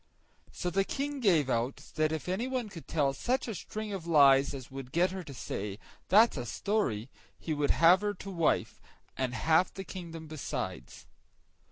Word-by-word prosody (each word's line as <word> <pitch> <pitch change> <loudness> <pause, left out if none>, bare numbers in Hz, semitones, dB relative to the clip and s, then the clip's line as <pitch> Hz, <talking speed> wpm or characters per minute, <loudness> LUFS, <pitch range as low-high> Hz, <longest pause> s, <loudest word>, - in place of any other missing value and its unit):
So 180 - -3
the 195 +3 +2
King 280 +6 -3
gave 175 - +3
out, 125 +1 -2
that 155 0 +1
if 160 +1 -4
anyone 240 +5 -2
could 170 -5 -10
tell 145 -4 +1
such 255 - -1
a 225 - -3
string 215 +2 -5
of 175 -4 -5
lies 140 -4 +6
as 130 -2 -9
would 135 -1 -8
get 175 +4 +2
her 190 0 -5
to 150 - -10
say, 105 -5 -5 0.3
"That's 215 +1 +5
a 125 - -3
story," 130 - -1 0.3
he 160 - -3
should 145 -1 0
have 170 +4 +6
her 205 0 -1
to 195 +1 -8
wife, 170 -4 0 0.3
and 130 -1 -2
half 160 +3 +3
the 195 - -7
kingdom 170 -4 -8
besides. 155 -2 -5
165 Hz, 180 wpm, -30 LUFS, 140-195 Hz, 0.3 s, lies